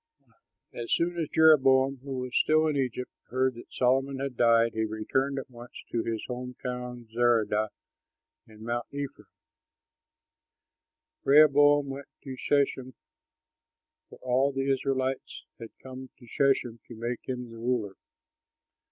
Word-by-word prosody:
As 120 -1 -6
soon 175 +1 +1
as 160 - -2
Jeroboam, 135 -4 +5
who 135 +1 -6
was 125 -1 -6
still 155 0 +4
in 155 -2 0
Egypt, 125 -2 -2 0.2
heard 130 +1 +1
that 120 - -13
Solomon 135 +2 +1
had 135 -1 -4
died, 115 -1 +4
he 110 - -1
returned 120 +6 -1
at 135 - -5
once 120 -1 -13 0.2
to 115 - 0
his 115 -1 -3
home 125 0 -6
town, 125 -1 -5
Zeredah 115 -3 +2 0.8
in 110 0 -14
Mount 120 +1 -3
Ephraim. 140 -1 -6 2.0
Rehoboam 145 0 +5
went 135 +1 -7 0.2
to 135 -1 -6
Shechem, 130 -2 0 1.1
for - - -13
all 130 +2 +2
the 135 0 -1
Israelites 130 0 -2
had 115 -1 -8
come 130 0 -9
to 120 - -16
Shechem 120 -2 +1
to 120 - -10
make 120 +2 -3
him 125 -2 -4
ruler. 115 -3 -2
130 Hz, 135 wpm, -28 LUFS, 120-135 Hz, 2.0 s, Jeroboam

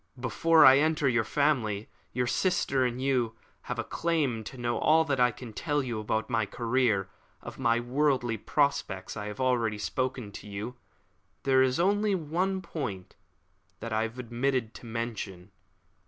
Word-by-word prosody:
Before 160 +5 +4
I 135 +1 +8
enter 155 -1 +2
your 120 -3 +2
family, 115 -8 0 0.2
your 125 0 0
sister 135 -3 +1
and 125 0 -2
you 125 -4 0 0.3
have - - -2
a - - -1
claim 150 -9 -1
to 130 - -8
know 120 -1 -1
all 160 +1 +4
that 140 -3 0
I 125 0 +5
can 115 0 -9
tell 145 +3 -1
you 120 -4 -3
about 110 +1 -1
my 115 -4 0
career. 115 -5 +1 0.4
Of - - -9
my 115 0 +2
worldly 125 -2 +1
prospects 125 -7 -1
I 105 -1 -5
have 105 0 -7
already 120 -5 +1
spoken 125 0 -3
to 100 - -10
you. 105 +4 -5 0.7
There 130 -1 +4
is 130 +1 +2
only 205 +3 +2
one 185 +4 -1
point 110 - -5 0.6
which 115 - -6
I 110 0 +1
have 115 +2 -3
omitted 125 -1 -1
to 120 - -11
mention. 110 -5 -5
125 Hz, 165 wpm, -29 LUFS, 110-140 Hz, 0.7 s, I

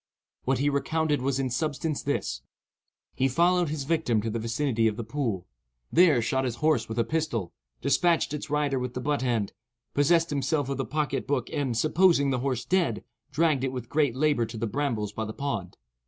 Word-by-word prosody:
What 135 0 +2
he 140 - +1
recounted 150 +1 +1
was 135 +1 0
in 130 -2 -1
substance 155 +2 -1
this:—He 140 -1 -4
followed 175 +4 +3
his 150 -2 -3
victim 140 -7 +1
to 115 - -2
the 115 - -2
vicinity 115 0 +1
of 110 -1 -1
the 120 - -3
pool; 110 -7 -2 0.5
there 160 -8 +5
shot 130 +3 0
his 125 -3 -2
horse 140 -4 +1
with 110 - -5
a 115 - +3
pistol; 135 - -2 0.3
despatched 165 +3 +2
its 150 0 -5
rider 145 -2 +1
with 125 0 -4
the - - -2
butt 145 +2 0
end; 115 -6 0 0.4
possessed 165 +3 +3
himself 145 0 0
of 135 - -2
the 135 - -1
pocket 150 +1 -2
book; 135 -4 -1
and, 135 -6 -1
supposing 155 -1 +4
the 130 - 0
horse 125 -2 -2
dead, 175 - +1 0.3
dragged 155 -5 +2
it 135 - 0
with 125 -2 -6
great 145 -5 +1
labour 140 -4 +2
to 115 +1 -8
the 115 - -1
brambles 110 -4 -2
by 110 - -3
the 110 - -6
pond. 115 -11 -4
135 Hz, 195 wpm, -27 LUFS, 120-150 Hz, 0.5 s, there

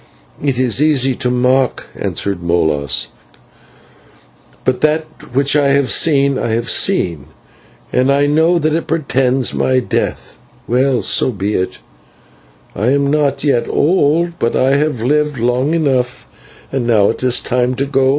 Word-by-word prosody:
"It 135 -4 0
is 130 0 +2
easy 135 -4 +3
to 125 - -2
mock," 125 +1 +1
answered 100 -3 -3
Molas, 80 -6 0 1.6
"but 125 -1 0
that 155 +1 +1 0.3
which 140 +2 +2
I 145 -1 +3
have 140 -5 +1
seen, 140 +1 +2
I 115 - -2
have 115 +1 -1
seen, 80 -6 0 0.7
and 130 +2 +2
I 140 +1 +2
know 160 +4 +2
that 155 -1 0
it 165 - -2
portends 135 -4 0
my 130 - +1
death. 125 - -4 0.3
Well, 130 +1 +1
so - - +2
be 100 -2 -3
it; 95 -1 -2 1.0
I 105 - -1
am 140 +2 +2
not 140 -1 0
yet 140 -5 0
old, 170 +1 +1
but 115 - 0
I 135 +1 +2
have 145 -6 -1
lived 150 +2 0
long 125 +6 0
enough 130 -6 -1 0.4
and 130 -3 -2
now 105 -4 +3
it - - -8
is 125 -1 +2
time 125 0 -1
to 140 - -1
go. 135 -1 +1
130 Hz, 150 wpm, -15 LUFS, 120-145 Hz, 1.6 s, easy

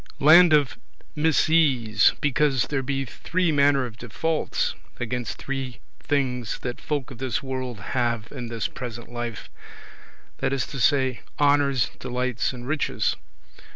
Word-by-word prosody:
Land 165 +4 +8
of 145 -3 +3 0.4
misease, 150 -8 +3
because 145 -2 +2
there 135 -2 0
be 135 +1 -2
three 175 +7 -1
manner 140 -2 +3
of 115 -2 -9
defaults 155 +8 -1 0.3
against 120 0 -3
three 135 -2 -5 0.2
things 125 -5 -1
that 125 -1 -4
folk 145 -3 -3
of 125 - -10
this 130 -2 -2
world 130 -4 -4
have 120 -3 0
in 125 -4 -6
this 115 -1 -2
present 120 -1 -8
life; 120 -2 -5 0.9
that 135 - 0
is 135 -3 0
to 135 - -7
say, 130 -2 +2 0.2
honours, 140 -3 +3
delights, 125 -2 -1
and 125 -1 -8
riches. 155 0 0
130 Hz, 135 wpm, -25 LUFS, 120-145 Hz, 0.9 s, Land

